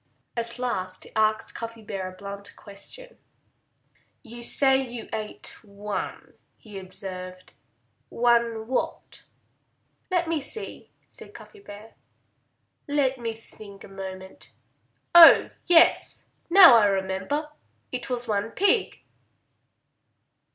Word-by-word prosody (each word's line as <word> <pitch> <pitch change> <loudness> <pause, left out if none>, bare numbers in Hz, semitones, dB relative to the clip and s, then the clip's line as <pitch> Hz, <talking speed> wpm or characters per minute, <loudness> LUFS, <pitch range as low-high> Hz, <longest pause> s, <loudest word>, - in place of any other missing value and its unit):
At 235 0 -4
last 190 -7 -3
he - - -12
asked 215 0 +1
Cuffy 230 -1 -8
a 190 -3 -5
blunt 200 +1 -9
question. - - -8 1.0
"You 240 -1 -11
say 265 +2 +3
you 245 -3 -7
ate 215 +1 -7
one," 205 0 -6 0.2
he 210 -3 -10
observed. 185 -1 -7 0.6
"One 235 -2 +1
what?" 255 +3 -4 0.8
"Let 355 -2 0
me 325 -2 -1
see," 435 +11 -7 0.2
said - - -12
Cuffy 425 - -14
Bear. 215 - -13 0.9
"Let 275 -3 0
me 230 -1 -3
think 215 -2 -14
a - - -11
moment.... 190 -1 -10 0.6
Oh, 340 -1 +9 0.2
yes! 340 -2 +4 0.3
Now 355 -5 +9
I 210 -2 +4
remember. 195 +10 -2 0.4
It 250 -1 -5
was 245 -1 -2
one 210 0 -1
pig!" 405 - 0
225 Hz, 110 wpm, -25 LUFS, 200-265 Hz, 1.0 s, Oh